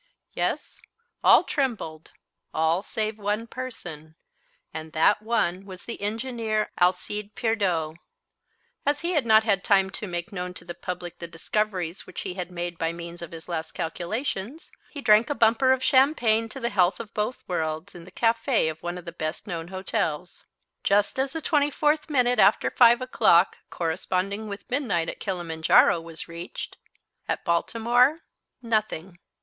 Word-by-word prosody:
Yes, - - -2 0.4
all - - +7
trembled, 215 - -2 0.5
all 160 +3 +2
save 215 +1 -3
one 210 +2 -1
person, 175 -12 -8 0.6
and 155 0 -7
that 165 +7 +4
one 205 -5 0
was 190 -1 -11
the 230 - -6
engineer 220 0 -2
Alcide 205 +3 0
Pierdeux. 185 -9 0 0.9
As 290 0 +1
he 340 +1 -1
had 295 -9 +1
not 220 0 +6
had 200 -3 +1
time 195 -2 +3
to 210 - -5
make 175 +3 -4
known 180 -2 -5
to - - -8
the 175 - -6
public 175 0 -6
the 170 - -6
discoveries 180 0 -2
which - - -6
he - - -4
had 180 -1 -5
made 175 -1 -5
by 165 0 0
means 170 0 -8
of 170 - -6
his 165 -1 -10
last 160 -2 -4
calculations, 210 - -4 0.2
he 285 - -7
drank 220 +1 +5
a 290 - 0
bumper 235 +3 +4
of 260 0 +2
champagne 250 -5 +3
to 270 - -8
the 235 -1 -2
health 185 -2 +3
of 225 -3 -8
both 215 +4 -2
worlds 160 -2 -2
in 175 - -10
the - - -14
café 230 - +2
of 160 0 -13
one 175 +1 -4
of 180 - -9
the 170 - -6
best 155 +3 -4
known 170 -5 -5
hotels. 185 -3 -3 0.4
Just 205 +5 +2
as 265 0 +1
the 325 -1 -5
twenty 290 -2 +2
fourth 300 +2 +1
minute 250 -4 +2
after 200 +2 +4
5 240 0 +6
o'clock, 190 -8 +4
corresponding 185 +5 -2
with 200 -1 -7
midnight 235 - 0
at - - -7
Kilimanjaro, 170 -3 +3
was 165 -1 -8
reached 170 +2 -7 0.5
At - - -2
Baltimore, 240 - +2 0.4
nothing. 215 -6 -2
200 Hz, 165 wpm, -26 LUFS, 170-230 Hz, 0.9 s, all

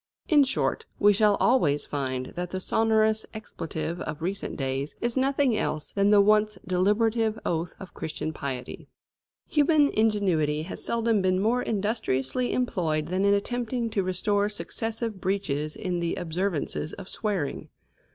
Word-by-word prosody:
In 295 -3 +6
short, 440 - -1
we 205 0 +5
shall 210 0 +4
always 160 - +2
find 130 -3 -3
that 180 0 -3
the 185 - -3
sonorous 220 +1 +2
expletive 170 -5 -5
of 150 +1 -5
recent 195 +3 -3
days 135 +1 -2
is 240 0 -1
nothing 270 -2 +2
else 155 -7 -2
than 200 0 +2
the 205 -1 +6
once 210 0 +4
deliberative 215 +4 +2
oath 170 +1 -2
of 195 - -10
Christian 155 0 -4
piety. 130 -4 -6 0.6
Human 295 -1 +4
ingenuity 185 -9 +1
has 175 - -7
seldom 230 -2 +1
been 185 0 +2
more 230 +5 +2
industriously 215 - -1
employed 165 -11 0
than 185 +2 +1
in 200 0 +5
attempting 240 +2 -2
to 205 - +1
restore 200 +3 0
successive 220 +2 -4
breaches 155 -6 -1
in 180 -2 -2
the 170 -1 -1
observances 170 -2 -2
of 195 - -9
swearing. 195 -11 -2
200 Hz, 145 wpm, -27 LUFS, 165-225 Hz, 0.6 s, In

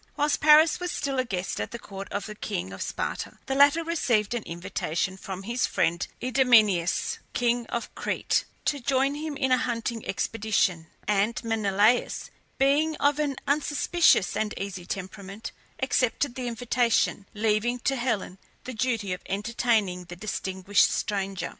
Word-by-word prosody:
Whilst 295 0 +1
Paris 305 +1 +6
was 360 0 -2
still 275 -2 -2
a - - +3
guest 185 -4 -3
at - - -3
the 235 - -6
court 195 -3 -9
of 205 -1 -3
the 215 - -6
king 95 - -4
of 95 - -8
Sparta, - - -4
the 265 - -2
latter 285 +4 +5
received 245 -10 +1
an 240 - -1
invitation 170 +1 -3
from 190 0 -7
his 235 +4 0
friend 170 +1 0
Idomeneus, 230 -9 +3
king 240 -1 +1
of 235 - -4
Crete, - - 0 0.2
to 290 - +1
join 270 +2 +1
him 300 0 -4
in 265 -2 0
a 255 - +5
hunting 230 -1 -2
expedition; 205 -5 0 0.2
and 210 +3 +1
Menelaus, 220 +1 +1 0.3
being 295 +4 +3
of 290 0 +2
an 290 -2 0
unsuspicious 295 - +3
and 215 -1 -1
easy 190 -3 -5
temperament, 195 +2 -6 0.3
accepted 255 0 +1
the 250 0 -4
invitation, 235 -3 +1
leaving 220 +3 +1
to 270 - +1
Helen 225 -7 -2 0.2
the 255 - -6
duty 220 -5 -1
of 180 - -6
entertaining 210 -3 0
the 175 - -9
distinguished 190 0 +1
stranger. 195 -3 -2
225 Hz, 155 wpm, -27 LUFS, 195-265 Hz, 0.3 s, Paris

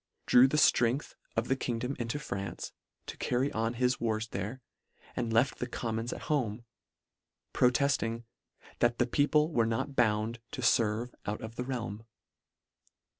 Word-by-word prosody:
drew 125 +2 +7
the 150 - 0
ftrength 125 -1 +3 0.2
of 115 +1 0
the 135 - +2
kingdom 125 +1 -2
into 120 +4 -2
France, 100 -9 -5 0.3
to - - -7
carry 130 +3 0
on 115 +2 -1
his 125 +1 +1
wars 110 -1 -1
there, 105 +7 -4 0.6
and 120 -2 -1
left 115 +4 +2
the 125 - -2
Commons 115 -1 -3
at - - -6
home, 120 -7 -1 0.9
pro 125 - +5
tefting, 125 -4 0 0.3
" - - -24
that 120 0 +3
the 120 - +3
people 150 +5 +2
were 115 -6 +2
not 115 +5 -2
bound 110 0 +1
" - - -41
to 130 - -4
ferve 115 0 +2
out 105 +1 -2
of 110 +1 -7
the 125 - -3
realm." 115 -4 -4
120 Hz, 165 wpm, -31 LUFS, 115-130 Hz, 0.9 s, drew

